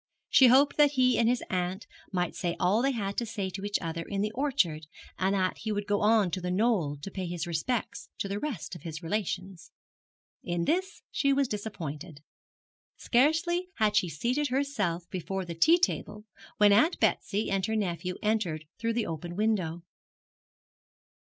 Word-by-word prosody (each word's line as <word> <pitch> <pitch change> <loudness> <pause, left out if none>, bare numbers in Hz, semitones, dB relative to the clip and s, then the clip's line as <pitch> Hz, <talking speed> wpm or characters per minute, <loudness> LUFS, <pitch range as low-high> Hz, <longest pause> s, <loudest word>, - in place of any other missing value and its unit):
She 260 - +8
hoped 270 +4 +5
that 295 -1 +5
he 255 -3 +3
and 230 0 +4
his 245 0 0
aunt 185 +2 -2 0.3
might 180 -3 -1
say 175 -2 -2
all 195 +5 +3
they 270 - +2
had 200 -5 -3
to 235 - 0
say 200 -4 -3
to 195 +1 -6
each 205 0 0
other 165 0 -3
in 195 +4 -3
the 210 +1 -1
orchard, 220 - 0 0.3
and 190 +1 +2
that 185 -1 0
he 220 - -3
would 205 -1 -2
go 205 0 0
on 210 -4 +4
to 185 - -3
The 180 - -3
Knoll 185 -7 +1
to 195 - -6
pay 185 -2 -4
his 170 -2 -3
respects 175 +9 -3
to - - -2
the 200 +1 -3
rest 260 - -4
of 175 - -8
his 165 0 -7
relations. 185 -1 -3 0.7
In 175 -1 -1
this 375 +4 -1
she 275 - +2
was 275 -1 +2
disappointed. 175 -8 -6 0.8
Scarcely 325 +8 +2
had 210 -1 +2
she 180 - +3
seated 250 - -1
herself 235 -11 -1
before 190 +1 -3
the 170 - -5
tea 320 - +5
table 210 -11 -2 0.3
when 205 -1 +6
Aunt 250 - +3
Betsy 205 +1 0
and 195 -1 0
her 220 - -1
nephew 180 -3 -2
entered 195 -8 0
through 230 0 0
the 230 -1 0
open 170 +2 -5
window. 185 -6 0
200 Hz, 180 wpm, -29 LUFS, 175-235 Hz, 0.8 s, She